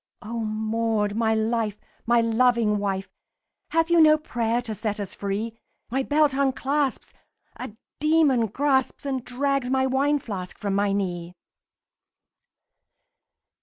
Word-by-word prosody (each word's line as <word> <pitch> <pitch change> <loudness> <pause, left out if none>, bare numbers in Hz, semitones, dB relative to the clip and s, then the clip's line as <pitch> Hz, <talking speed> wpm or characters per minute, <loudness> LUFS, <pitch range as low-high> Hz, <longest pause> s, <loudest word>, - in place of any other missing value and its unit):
"O 230 +2 -5
Maud, 220 -1 -1
my 220 0 +1
life! 220 -1 0 0.3
my 235 0 +4
loving 230 -2 +2
wife! 195 -1 -2 0.6
Have 330 +1 +1
you 340 -1 +6
no 310 -1 +7
prayer 235 -6 -1
to 225 -3 -4
set 210 0 -3
us 200 - -5
free? 205 +3 -3 0.4
My 265 +2 +1
belt 295 +1 +2
unclasps, 275 +1 -1 0.4
a 250 -4 -7 0.3
demon 300 -6 +3
grasps 265 +4 0
And 265 -3 -2
drags 265 +1 -1
my 265 0 +2
wine 275 +3 +2
flask 195 -9 -6
from 200 -2 -2
my 200 0 +1
knee!" 180 -3 -3
235 Hz, 130 wpm, -25 LUFS, 210-270 Hz, 0.6 s, no